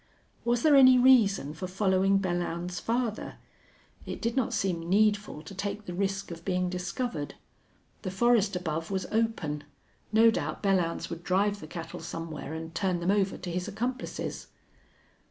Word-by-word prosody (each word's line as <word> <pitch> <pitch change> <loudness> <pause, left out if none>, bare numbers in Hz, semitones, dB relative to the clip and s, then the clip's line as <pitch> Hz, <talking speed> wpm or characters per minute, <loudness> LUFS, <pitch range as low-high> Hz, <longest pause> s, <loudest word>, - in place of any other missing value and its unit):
Was 240 0 +1
there 305 -2 +6
any 260 -2 +8
reason 220 - +4
for 185 +4 -5
following 190 0 +2
Belllounds 175 -1 -2
farther? 230 -2 -2 0.7
It - - -6
did 230 0 -1
not 260 -3 +1
seem 185 -7 -1
needful 205 -5 +2
to 195 - -10
take 200 +2 -4
the 175 - -5
risk 195 +1 -2
of 165 0 -8
being 180 -1 0
discovered. 180 - -3 0.7
The - - -3
forest 215 0 +3
above 165 -2 -3
was 190 -1 -2
open. 215 -10 -1 0.5
No 225 +1 +6
doubt 155 -5 -3
Belllounds 180 -4 +1
would 170 0 -6
drive 200 +3 +1
the - - -9
cattle 165 -2 -7
somewhere 165 -2 -6
and 160 0 -6
turn 185 -2 0
them 175 +3 +1
over 200 -1 +1
to 175 - -6
his 180 +1 -2
accomplices. 245 +5 -4
195 Hz, 155 wpm, -29 LUFS, 175-215 Hz, 0.7 s, any